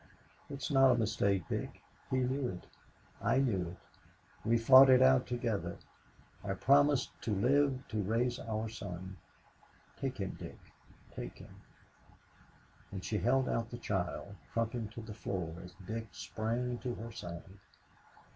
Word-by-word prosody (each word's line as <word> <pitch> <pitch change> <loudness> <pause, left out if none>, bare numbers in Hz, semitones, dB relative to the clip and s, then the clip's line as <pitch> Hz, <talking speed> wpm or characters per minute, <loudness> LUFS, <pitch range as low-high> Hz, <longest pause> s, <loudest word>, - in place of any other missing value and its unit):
"It 140 -1 -6
is - - -2
not 135 -1 +6
a 125 - +4
mistake, 100 -5 +1
Dick. - - -4 0.3
He 130 - +1
knew 130 +1 0
it. 90 -6 -6 0.6
I - - +2
knew 105 -10 +1
it. 85 - -8 0.7
We 115 +1 +3
fought 130 +3 +9
it 130 -1 +8
out 130 -1 +5
together. 120 -4 -2 0.7
I 95 -1 -2
promised 140 +2 +4
to 105 - -1
live 130 +4 +2
to 110 -2 -1
raise 120 +5 0
our 110 0 -3
son. 95 -4 -7 0.8
Take 135 -2 -3
him, 95 -3 -2
Dick - - -8 0.5
take - - -7
him," - - -13 1.4
and 95 -2 -6
she 105 - 0
held 130 +2 +2
out 115 0 -1
the 120 - -6
child, 95 -2 -3 0.2
crumpling 115 -1 -1
to 115 +2 -8
the 110 -1 -8
floor 90 -6 -4
as 90 -1 -12
Dick 110 +3 -4
sprang 120 +2 -2
to 125 -1 -3
her 115 +2 -7
side. 95 -2 -8
115 Hz, 150 wpm, -33 LUFS, 100-130 Hz, 1.4 s, fought